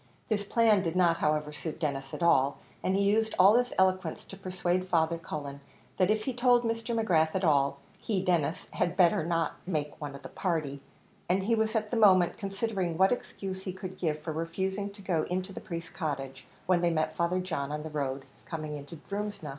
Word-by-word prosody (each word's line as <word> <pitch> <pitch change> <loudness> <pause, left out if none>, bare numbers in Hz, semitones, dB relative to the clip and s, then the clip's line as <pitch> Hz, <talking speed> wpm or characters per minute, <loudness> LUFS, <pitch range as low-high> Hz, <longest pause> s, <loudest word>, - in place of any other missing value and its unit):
This 210 -2 +1
plan 215 -1 +4
did 170 -2 -2
not, 175 -2 +4
however, 150 0 0
suit 155 +1 -5
Denis 135 -3 -2
at - - -4
all, 140 -4 +4 0.2
and 190 - +1
he 200 - +2
used 220 +2 +2
all 195 +3 +7
his 245 0 -1
eloquence 185 -3 +1
to - - -10
persuade 185 -1 -1
Father 165 -2 +2
Cullen, 145 -3 -6 0.4
that 185 0 +3
if 215 0 +2
he 260 - -2
told 245 0 +4
Mr. 230 0 -1
McGrath 160 -7 +2
at 190 - 0
all, 140 -4 +3 0.2
he, 210 -4 -1
Denis, 175 -2 0
had 175 +1 -1
better 175 -4 +4
not 165 0 -1
make 155 -4 -3
one 145 -2 -5
of 140 - -11
the 135 - -8
party; 155 -6 -2 0.5
and 190 +2 +2
he 225 +4 +1
was 220 0 +1
at 215 -1 -1
the 240 - 0
moment 185 -5 +5
considering 195 -4 -2
what 190 +2 +5
excuse 195 -6 -4
he 185 -1 -5
could 185 0 -8
give 155 -4 0
for 160 0 -4
refusing 190 +5 -2
to 200 0 -12
go 175 -4 +1
into 185 +2 -2
the - - -7
priest's 170 -1 -6
cottage, 135 -5 -4 0.2
when 180 -2 +3
they 175 - +3
met 155 -1 0
Father 170 +2 +1
John 160 -6 -3
on 150 0 -3
the 160 - -5
road 135 -2 -2 0.2
coming 155 -3 -5
into 145 +4 -9
Drumsna. 205 -1 -5
180 Hz, 210 wpm, -29 LUFS, 155-195 Hz, 0.5 s, all